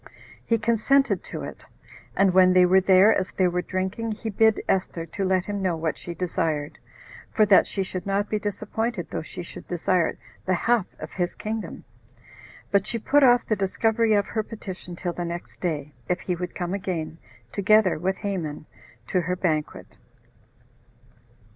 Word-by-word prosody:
He 230 - +2
consented 235 +5 +2
to - - -6
it; - - -8 0.5
and 195 -2 +3
when 185 0 +6
they 180 0 +6
were 190 +1 +5
there, 190 +3 +6
as 185 - -1
they 185 - +1
were 180 0 0
drinking, 190 +5 -3
he 220 +1 -5
bid 220 +1 +3
Esther 180 -3 -1
to 195 +5 -4
let 185 -1 +1
him 205 -1 -3
know 180 -3 0
what 160 -1 -1
she 175 - -8
desired; 160 -4 -2 0.5
for 215 - +3
that 195 -2 +6
she 195 - -1
should 185 0 -5
not 200 +1 0
be 215 - -1
disappointed 210 0 -3
though - - -2
she 175 +3 -7
should - - -10
desire 175 0 0 0.3
the 185 - +1
half 230 +1 +1
of - - -8
his 175 -1 -2
kingdom. 215 -4 -5 0.9
But 200 0 +2
she 230 - -1
put 285 +6 +3
off 245 -3 +5
the 215 - +1
discovery 220 +3 +1
of 205 -1 +2
her 220 - -2
petition 190 -5 -8
till 175 0 -3
the 175 - -4
next 170 0 -6
day, 150 -4 -3 0.2
if 180 0 +1
he 180 - -2
would 180 0 -5
come 175 0 -3
again, 170 -5 -3 0.3
together 200 -3 +3
with 190 +3 0
Haman, 175 -8 -4 0.4
to 180 - +2
her 180 +2 -1
banquet. 160 -5 -2
190 Hz, 175 wpm, -25 LUFS, 175-215 Hz, 0.9 s, when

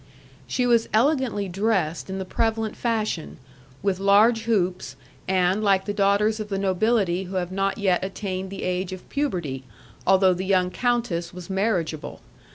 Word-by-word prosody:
She 250 - 0
was 235 -2 +3
elegantly 245 -5 +2
dressed 190 -4 -1
in 190 - -3
the 190 - -4
prevalent 225 +2 -1
fashion, 215 -8 -2 0.5
with 195 -2 0
large 215 +4 +4
hoops, 180 - 0 0.3
and 185 +2 +2
like 195 -2 +3
the 205 - -2
daughters 205 +2 +2
of 210 -1 -5
the 195 - -1
nobility 195 -1 +1
who 185 +1 -7
have 180 -1 -2
not 195 +1 -1
yet 190 -4 +1
attained 190 -1 -4
the 195 - -6
age 185 +1 -2
of 185 - -10
puberty, 175 - -2 0.4
although 190 -1 +5
the 180 +1 -4
young 185 -1 +2
countess 215 -9 -1
was 180 +1 -8
marriageable. 190 -6 -1
195 Hz, 160 wpm, -24 LUFS, 185-220 Hz, 0.5 s, although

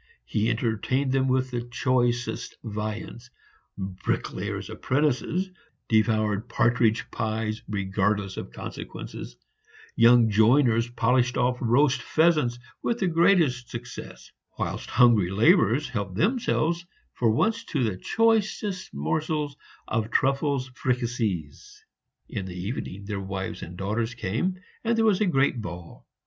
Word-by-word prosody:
He 105 - 0
entertained 120 +4 0
them 135 0 +2
with 130 0 +1
the 120 -1 -2
choicest 120 0 -1
viands; 110 +2 -5 0.5
bricklayers' 95 -1 -3
apprentices 150 - 0 0.4
devoured 110 -1 +2
partridge 115 -2 +2
pies 110 0 -2
regardless 100 0 -1
of - - -7
consequences; - - -8 0.6
young 115 0 +6
joiners 115 +2 +4
polished 125 +1 +1
off 125 0 +1
roast 130 +2 +3
pheasants 155 -7 +2 0.2
with 235 - 0
the 195 - 0
greatest 165 -8 +3
success; 120 +1 -8 0.3
whilst - - -3
hungry 115 -6 +5
laborers 110 +6 +4
helped 100 -6 -4
themselves 175 - +1 0.3
for 120 - +1
once 225 - +1
to 140 -5 -1
the 110 -5 0
choicest 215 - 0
morsels 150 - -1 0.3
of 110 0 -1
truffes 135 0 +1
fricassees. 120 - -3 0.4
In 95 -2 -5
the 90 -1 -7
evening 100 -1 -5
their 100 -1 -3
wives 95 0 -4
and 90 +2 -8
daughters 110 +5 -2
came, 115 - -1 0.3
and 230 0 +1
there 225 - +3
was 215 -2 +3
a 210 - +3
great 135 -6 +2
ball. 85 -3 -9
120 Hz, 120 wpm, -26 LUFS, 105-140 Hz, 0.6 s, young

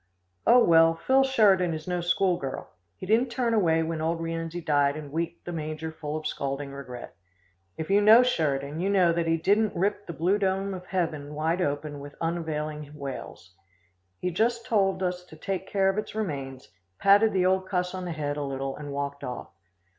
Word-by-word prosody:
"Oh, 245 0 +7
well, 165 0 +5
Phil 265 +10 +3
Sheridan 195 -10 +3
is 155 +1 -8
no 180 -1 -1
school 180 +1 +2
girl. 135 -1 -6 0.3
He - - -7
didn't 225 +6 +2
turn 235 -1 0
away 165 -7 +3
when 160 -1 -3
old 165 +1 -1
Rienzi 165 +1 -4
died 145 -3 +2
and 150 -2 -8
weep 165 +2 -3
the 175 - -6
manger 155 -1 -4
full 155 -1 -5
of 155 - -8
scalding 140 -1 -3
regret. 130 -3 -9 0.6
If 160 +4 -4
you 200 +1 +5
know 220 +4 +8
Sheridan, 150 - -1
you 190 +3 0
know 185 -4 +4
that 170 0 -1
he 165 0 +2
don't 205 +6 +2
rip 205 +3 -1
the 170 - -5
blue 180 +6 +1
dome 195 0 0
of 180 -1 -8
heaven 155 -5 -2
wide 160 +4 0
open 145 -1 -2
with 145 +1 -10
unavailing 155 -3 -3
wails. 135 -9 -8 0.6
He 180 - -2
just 230 +5 0
told 195 -3 +1
us 180 0 -2
to 160 - -14
take 190 +3 -4
care 195 -1 +1
of 195 +2 +1
its 215 - -6
remains, 135 -11 -4 0.3
patted 205 - +5
the 185 -1 +1
old 190 0 +1
cuss 180 -1 -1
on 185 -1 -5
the 175 - -4
head 145 -2 -3
a 145 - -2
little 135 -1 -3
and 145 -1 -7
walked 140 0 -4
off. 125 -2 -6
165 Hz, 200 wpm, -27 LUFS, 150-195 Hz, 0.6 s, know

